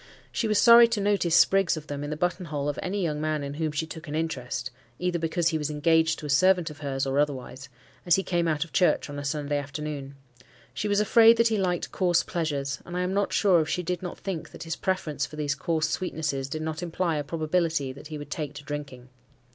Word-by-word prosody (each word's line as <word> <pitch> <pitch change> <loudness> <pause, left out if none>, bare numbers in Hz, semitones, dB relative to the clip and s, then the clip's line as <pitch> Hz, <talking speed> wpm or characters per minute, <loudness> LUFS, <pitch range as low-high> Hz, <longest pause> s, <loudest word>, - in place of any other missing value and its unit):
She 225 - -1
was 215 -1 +2
sorry 235 +1 +8
to 230 -2 -1
notice 200 -4 +2
sprigs 195 -4 +4
of 155 - -7
them 145 -1 -5
in 145 - -4
the 150 - -3
button 175 +2 -1
hole 145 -3 -3
of 145 - -2
any 195 +1 -2
young 150 -3 -1
man 155 -1 -1
in 140 0 -5
whom 155 +1 -2
she 150 +2 -2
took 160 +1 -9
an 145 - -4
interest, 130 -6 -3 0.3
either 180 -1 -1
because 165 +1 +1
he 160 -2 -1
was 150 0 -2
engaged 160 +2 +2
to - - -8
a - - -5
servant 180 +2 +3
of 150 - -13
hers 135 -2 -2
or 135 +1 0
otherwise, 135 -2 -3 0.3
as 175 -2 +4
he 195 - 0
came 175 -2 0
out 155 -1 +1
of 165 - -20
church 180 -5 +2
on 145 - -5
a - - -5
Sunday 145 0 -1
afternoon. 140 -1 -6 0.6
She 210 - -2
was 205 0 +2
afraid 225 +2 +6
that 230 0 +4
he 220 - +1
liked 180 -2 -1
coarse 175 -3 +2
pleasures; 145 -4 -2
and 175 +1 -6
I - - 0
am 180 +1 -1
not 200 0 0
sure 185 -5 +4
if 155 - -3
she 180 - -1
did 180 0 -2
not 180 -2 -6
think 185 -5 -5
that - - -9
his 165 -1 -3
preference 155 -7 -2
for - - -11
these 150 -2 -1
coarse 155 +2 -1
sweetnesses 150 -7 -2
did 155 +2 -4
not 160 +1 -4
imply 170 -1 -1
a 145 - -1
probability 155 -2 -1
that 140 +3 -11
he 155 0 -6
would 145 0 -9
take 150 -2 -4
to 145 - -8
drinking. 140 -4 -7
155 Hz, 245 wpm, -26 LUFS, 145-180 Hz, 0.6 s, sorry